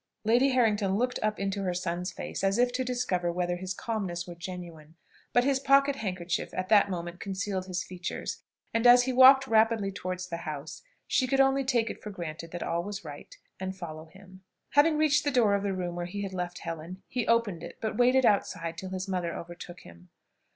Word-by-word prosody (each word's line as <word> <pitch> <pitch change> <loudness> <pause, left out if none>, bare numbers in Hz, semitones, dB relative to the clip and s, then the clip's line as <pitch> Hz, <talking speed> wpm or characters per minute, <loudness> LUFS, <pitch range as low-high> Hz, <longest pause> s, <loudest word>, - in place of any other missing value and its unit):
Lady 240 +5 +4
Harrington 215 -6 +2
looked 250 +4 0
up 215 0 -1
into 200 0 -2
her 180 -2 -1
son's 180 0 -2
face 175 - -6
as 195 +2 +2
if 245 0 +2
to 260 +1 0
discover 220 -9 -1
whether 175 0 -1
his 185 +1 -5
calmness 190 -7 -3
were 175 - -8
genuine; 170 -3 -9 0.4
but 245 - +4
his 270 0 +2
pocket 275 +1 +4
handkerchief 180 -5 -3
at 185 0 -3
that 205 -2 +5
moment 175 -1 -5
concealed 190 -1 -3
his 185 -1 -2
features, 180 -1 -5 0.3
and, 230 +1 +3
as 245 0 +8
he 260 +1 -1
walked 265 +1 +8
rapidly 225 -3 +3
towards 185 -1 -5
the 170 - -3
house, 155 -1 -6 0.2
she 260 - +1
could 270 +1 +1
only 270 0 +4
take 240 -4 +1
it - - -11
for 210 - -7
granted 165 -4 -6
that 175 +1 -5
all 170 +1 -1
was 200 -1 -6
right, 145 -1 -10 0.2
and 190 0 -4
follow 160 -3 -7
him. 190 +2 -16 0.3
Having 300 +2 +4
reached 300 -1 +3
the 290 - +1
door 240 -7 +3
of 200 - +1
the 200 0 -1
room 180 -2 -3
where 175 0 -3
he 200 +3 -5
had 195 -1 -5
left 180 -1 -4
Helen, 165 +3 -7
he 245 -2 -2
opened 230 -7 +2
it, - - -9
but 220 - -3
waited 250 +1 +4
outside 170 -5 0
till 190 - -6
his 190 +1 -4
mother 180 -3 -2
overtook 175 +1 -9
him. 85 +1 -16
190 Hz, 210 wpm, -29 LUFS, 175-240 Hz, 0.4 s, as